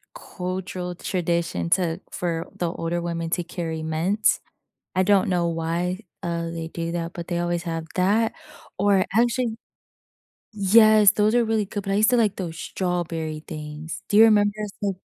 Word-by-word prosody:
cultural 185 - -5
tradition 170 - -1
to 170 -1 +2
for 165 -2 -3
the 170 -2 -1
older 170 0 -2
women 170 -1 -3
to 175 - 0
carry 165 -2 -4
mints. 170 +7 +1 0.6
I 185 - +3
don't 195 0 +3
know 175 -2 +1
why, 170 +3 -2 0.2
uh, 170 -2 -2
they 165 -1 -5
do 165 0 -4
that, 170 -1 -3
but 170 0 -7
they 175 - -1
always 175 0 -1
have 165 -2 -3
that 205 +5 +2 0.5
or 200 -1 +3
actually 235 0 +2 1.0
Yes, 210 +1 +6
those 210 +1 +2
are 240 -1 +4
really 220 -1 +1
good, 205 +1 -5
but 195 - -2
I - - +2
used 215 +4 +4
to 250 - +4
like 215 -4 +2
those 170 -4 -5
strawberry 165 -4 -3
things. 150 +1 -7
Do 205 - +4
you 225 - +10
remember 205 -2 +5 0.3
s 200 -1 +1
180 Hz, 165 wpm, -24 LUFS, 165-205 Hz, 1.0 s, you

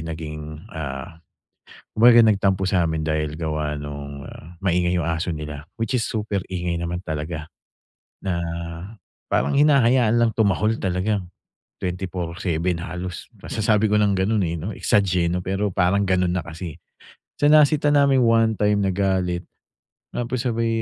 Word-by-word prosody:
naging, 75 -1 -7
ah, 80 +1 -6 0.7
kumbaga 120 +1 +7
nagtampo 95 -2 +2
sa'min 80 -4 0
dahil 75 -1 -1
gawa 75 -2 -2
nung, 70 -1 -7
ah, 85 +2 -12
maingay 90 -2 +1
yung 85 - -1
aso 80 +2 -1
nila. 75 -1 -6
Which 115 +3 -2
is 125 - +2
super 105 -4 -2
ingay 85 -2 -2
naman 85 +1 -3
talaga, 75 0 -4 0.8
na 90 -3 -1 0.9
parang - - +1
hinahayaan 130 -5 +4
lang 120 -1 +3
tumahol 110 +1 +1
talaga, 95 +2 0 0.6
24/7 90 -1 -2
halos, 90 0 -6
masasabi 110 0 +1
ko 105 - +3
ng 105 -1 +3
ganun, 100 +2 +1
eh, 85 - -2
'no? 95 +7 -4
Exag, 100 -1 +2
eh, 85 -1 +2
'no, 90 - -1
pero 95 +2 -1
parang 95 +3 +2
ganun 90 -1 +2
na 90 - -2
kasi, 85 -1 -7
eh. - - -25 0.6
So 145 +1 +4
nasita 150 -1 +5
namin 140 -3 +4
one 115 -1 +3
time, 105 0 +2
nagalit, 95 -2 0 0.7
tapos 120 +1 -3
sabay 115 -2 0
90 Hz, 145 wpm, -23 LUFS, 80-110 Hz, 0.9 s, kumbaga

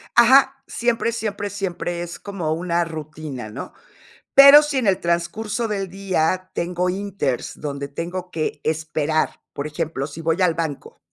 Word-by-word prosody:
Ajá, 270 +3 +6
siempre, 235 -1 0
siempre, 205 -3 -3
siempre 180 -3 -3
es 175 0 -6
como 190 -6 -4
una 170 +1 0
rutina, 155 -6 -7
¿no? 110 +6 -8 0.6
Pero, 280 +2 +10
si 295 -2 -2
en 250 - 0
el 195 -2 +3
transcurso 205 +7 -1
del 195 -2 -2
día 185 -1 -1
tengo 180 +1 -1
inters, 190 -9 -3
donde 140 -1 -4
tengo 175 +5 -5
que 155 -3 -3
esperar, 155 0 -1
por 140 - -4
ejemplo, 150 -3 -3
si 150 +2 -9
voy 165 +2 0
al 175 -3 +3
banco 160 -4 -5
175 Hz, 150 wpm, -22 LUFS, 155-200 Hz, 0.6 s, Pero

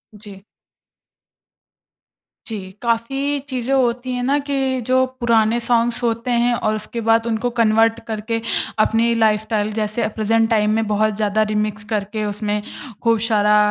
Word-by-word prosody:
जी। 200 -2 -12 2.0
जी, 220 -3 -4 0.2
काफ़ी 270 +5 -1
चीज़ें 255 +1 -2
होती 250 -1 +1
हैं 250 0 -2
ना 280 +3 +2
कि 265 -2 0
जो 260 0 +3
पुराने 230 -1 +2
सॉन्ग्स 235 0 +1
होते 230 +1 -1
हैं 240 0 +2
और 215 -2 0
उसके 215 +2 -5
बाद 225 0 +2
उनको 230 +2 -1
कन्वर्ट 225 +1 +3
करके 225 +1 -3 0.4
अपनी 225 +2 +3
लाइफस्टाइल 215 -1 +1
जैसे 215 +1 -2
अ, - - +1
प्रेजेंट 225 +1 +2
टाइम 215 -1 +2
में 225 0 +1
बहुत 215 0 +1
ज़्यादा 215 0 +1
रिमिक्स 210 0 -2
करके 210 +1 -2
उसमें 210 0 -2 0.4
खूब 230 -1 +3
सारा 210 -1 +4
225 Hz, 145 wpm, -20 LUFS, 215-240 Hz, 2.0 s, सारा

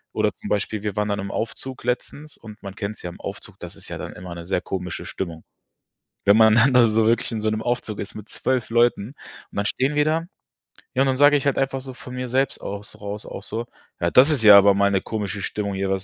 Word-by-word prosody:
oder - - +1
zum - - -9
Beispiel 105 +1 -1
wir 105 -3 -3
waren 105 0 0
dann 100 0 -1
im 100 0 -4
Aufzug 130 +3 -5
letztens 140 +5 -3
und 110 -1 -12
man 100 -1 -7
kennt 105 0 -4
es - - -10
ja 90 - -4
im - - -14
Aufzug, - - -8
das - - -9
ist - - -12
ja - - -5
dann - - -6
immer 90 -1 -8
'ne 85 0 -8
sehr 95 - +1
komische 90 -2 -5
Stimmung. 85 -4 -5 0.8
Wenn 100 - +6
man 110 -1 +6
dann 125 +3 +5
da 125 -2 +6
so 110 +1 +2
wirklich 115 +2 +1
in 115 - -2
so 110 - +1
'nem 110 0 -2
Aufzug 120 -3 -2
ist 105 - -6
mit 105 0 -9
12 130 -3 -1
Leuten 120 -2 +2 0.4
und - - -16
dann 100 - 0
stehen 135 +6 0
wir 150 - +4
da, 160 +2 +1 0.7
ja, 130 - +1
und - - +1
dann 130 -1 +1
sage 145 +1 +6
ich 140 - -2
halt 140 - +1
einfach 135 0 0
so 130 0 -8
von 125 - -10
mir 125 0 -4
selbst 130 +2 0
aus 100 0 -7
raus 105 +1 -6
auch - - -7
so: 115 +3 -4 0.3
„Ja, 85 - 0
das 130 +4 +7
ist 145 -7 +1
ja 105 -2 +10
aber 100 0 +6
mal 100 0 +3
'ne 95 -1 +1
komische 105 -2 -4
Stimmung 100 +1 -3
hier, 95 0 -2
was 95 0 0
110 Hz, 260 wpm, -23 LUFS, 100-125 Hz, 0.8 s, ja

